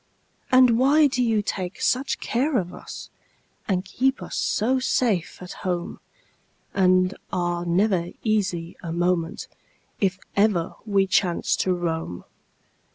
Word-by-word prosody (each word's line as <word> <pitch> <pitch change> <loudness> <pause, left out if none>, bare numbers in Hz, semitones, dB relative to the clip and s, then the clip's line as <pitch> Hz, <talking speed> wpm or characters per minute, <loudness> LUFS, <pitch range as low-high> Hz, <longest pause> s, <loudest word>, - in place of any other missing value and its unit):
And 255 -2 +6
why 290 +4 +5
do 255 -3 +1
you 225 -3 +2
take 185 -2 -4
such 265 +2 0
care 265 +4 0
of 180 -4 -2
us, - - -9 0.6
And 185 -1 0
keep 265 +8 0
us - - -6
so 255 +5 +1
safe 230 -8 0
at 180 - -8
home, 175 -2 -3 0.7
And 185 0 +3 0.2
are 175 -1 -1
never 180 0 +2 0.2
easy 185 -6 -1
a 170 - -5
moment 170 -1 -1 0.5
If 190 -2 +1 0.2
ever 200 -5 +2
we 200 -2 +3
chance 180 -2 +1
to 185 -1 +1
roam? 165 - -3
190 Hz, 130 wpm, -24 LUFS, 175-230 Hz, 0.7 s, And